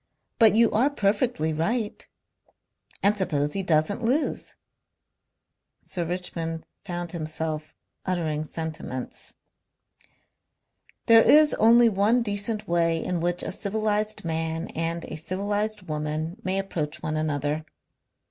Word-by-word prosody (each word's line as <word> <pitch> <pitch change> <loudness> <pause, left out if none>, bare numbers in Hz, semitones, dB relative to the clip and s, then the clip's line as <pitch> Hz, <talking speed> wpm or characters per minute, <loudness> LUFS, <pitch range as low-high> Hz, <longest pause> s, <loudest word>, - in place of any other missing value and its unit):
"But 220 -2 +7
you 230 0 +5
are 245 +7 +3
perfectly 205 - 0
right." 210 +8 -2 1.0
"And 200 +2 +4
suppose 150 -7 0
he 195 - 0
doesn't 170 +4 +1
lose!" 265 +7 0 1.3
Sir 175 -2 -2
Richmond 165 -2 -4 0.2
found 175 -3 -4
himself 155 -1 -4 0.3
uttering 160 -5 -1
sentiments. 155 -5 -5 1.7
"There 225 0 +8
is 300 +5 +6
only 235 +2 +6
one 220 +3 +3
decent 210 0 -2
way 170 -1 +2
in 180 -2 -1
which 175 +1 +1
a - - -3
civilized 215 0 -1
man 160 0 -2
and 165 +1 -2
a 155 - -7
civilized 205 +5 -2
woman 155 +2 -3
may 185 +1 0
approach 165 -6 -3
one 155 - -2
another. 150 0 -1
175 Hz, 115 wpm, -26 LUFS, 160-210 Hz, 1.7 s, There